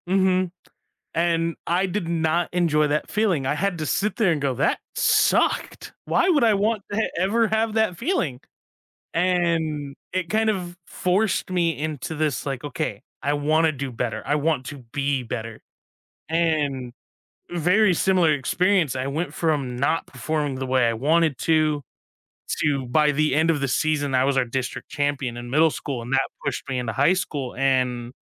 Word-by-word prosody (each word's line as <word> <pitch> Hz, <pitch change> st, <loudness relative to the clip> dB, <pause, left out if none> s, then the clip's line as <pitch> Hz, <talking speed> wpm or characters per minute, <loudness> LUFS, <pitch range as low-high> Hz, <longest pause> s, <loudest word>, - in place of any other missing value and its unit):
Mhm. 185 Hz, -1 st, +2 dB, 0.6 s
And 165 Hz, 0 st, +1 dB
I 180 Hz, +3 st, +2 dB
did 185 Hz, -2 st, -3 dB
not 170 Hz, 0 st, +1 dB
enjoy 160 Hz, -4 st, +2 dB
that 150 Hz, +1 st, -1 dB
feeling. 195 Hz, -10 st, +1 dB
I 140 Hz, -, +1 dB
had 195 Hz, +2 st, -1 dB
to 155 Hz, -, -3 dB
sit 205 Hz, +3 st, 0 dB
there 215 Hz, -6 st, +3 dB
and 155 Hz, -, -1 dB
go, 135 Hz, -2 st, 0 dB
"That 130 Hz, -, +1 dB, 0.2 s
sucked!" -, -, +2 dB
Why 365 Hz, -, +2 dB
would 305 Hz, -8 st, +4 dB
I 220 Hz, -2 st, +5 dB
want 210 Hz, +1 st, 0 dB
to 220 Hz, +2 st, 0 dB
ever 220 Hz, +5 st, +2 dB
have 220 Hz, 0 st, 0 dB
that 220 Hz, -5 st, +1 dB
feeling? 180 Hz, -, -1 dB, 0.7 s
And 165 Hz, -5 st, 0 dB, 0.2 s
it 185 Hz, -2 st, -2 dB
kind 220 Hz, 0 st, +2 dB
of 180 Hz, -4 st, -4 dB
forced 190 Hz, +2 st, 0 dB
me 170 Hz, -4 st, +1 dB
into 155 Hz, 0 st, -4 dB
this 155 Hz, -3 st, -1 dB
like, 135 Hz, -3 st, -3 dB
"Okay, 115 Hz, -7 st, -4 dB, 0.2 s
I 145 Hz, -, +1 dB
wanna 155 Hz, +2 st, +2 dB
do 140 Hz, -1 st, -5 dB
better, 120 Hz, -1 st, -3 dB
I 145 Hz, -, +2 dB
want 150 Hz, -3 st, 0 dB
to 145 Hz, -, -7 dB
be 140 Hz, -2 st, 0 dB
better." 115 Hz, -2 st, -6 dB, 0.7 s
And 150 Hz, -7 st, 0 dB, 0.6 s
very 180 Hz, +4 st, +3 dB
similar 180 Hz, -2 st, +3 dB
experience, 170 Hz, +2 st, +1 dB
I 130 Hz, +1 st, -2 dB
went 155 Hz, +6 st, -3 dB
from 145 Hz, -7 st, -1 dB
not 140 Hz, +6 st, 0 dB
performing 145 Hz, +2 st, -2 dB
the 130 Hz, 0 st, -3 dB
way 130 Hz, -2 st, +2 dB
I 115 Hz, -, +1 dB
wanted 155 Hz, +4 st, +2 dB
to, 155 Hz, -2 st, +2 dB, 0.8 s
to 140 Hz, -4 st, +1 dB
by 150 Hz, +4 st, +3 dB
the 150 Hz, -1 st, +1 dB
end 160 Hz, +3 st, +3 dB
of 155 Hz, -3 st, 0 dB
the 140 Hz, -, 0 dB
season, 145 Hz, 0 st, 0 dB
I 130 Hz, 0 st, +4 dB
was 140 Hz, 0 st, +1 dB
our 130 Hz, -, +3 dB
district 125 Hz, +1 st, -4 dB
champion 145 Hz, -4 st, -1 dB
in 120 Hz, 0 st, -7 dB
middle 155 Hz, +4 st, +4 dB
school, 135 Hz, -4 st, -4 dB
and 120 Hz, +3 st, -7 dB
that 135 Hz, 0 st, +2 dB, 0.2 s
pushed -, -, -3 dB
me 130 Hz, -2 st, -2 dB
into 120 Hz, -2 st, -2 dB
high 140 Hz, +9 st, +3 dB
school 145 Hz, -8 st, -3 dB
and 125 Hz, -2 st, 0 dB
155 Hz, 175 wpm, -23 LUFS, 135-180 Hz, 0.8 s, I